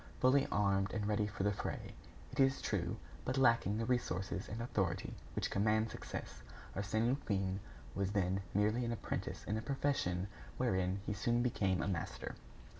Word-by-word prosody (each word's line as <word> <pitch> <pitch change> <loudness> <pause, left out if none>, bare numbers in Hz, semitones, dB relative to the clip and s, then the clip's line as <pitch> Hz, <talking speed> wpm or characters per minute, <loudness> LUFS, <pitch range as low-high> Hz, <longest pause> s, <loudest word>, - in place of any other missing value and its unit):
Fully 135 +2 +5
armed 100 -1 +2
and 110 -2 -1
ready 105 0 +2
for 100 -2 -3
the 105 - +3
fray, - - -4 0.4
it - - -7
is 135 0 +5
true, 95 0 -1 0.3
but 130 +1 -1
lacking 115 -5 +4
the 115 - 0
resources 95 -6 -1
and 110 - -4
authority 95 -6 -1 0.2
which - - 0
command 110 +2 +2
success, - - -6 0.3
Arsène 105 +3 +1
Lupin 100 -7 0 0.3
was 100 0 0
then 95 -1 +2
merely 105 +4 +3
an 120 0 0
apprentice 115 - -3
in 105 - -1
a - - -2
profession 110 -9 0 0.3
wherein 95 +1 +1
he 105 - -1
soon 120 +3 +2
became 95 -8 +1
a - - -1
master. 95 -5 -3
105 Hz, 165 wpm, -36 LUFS, 95-115 Hz, 0.4 s, Fully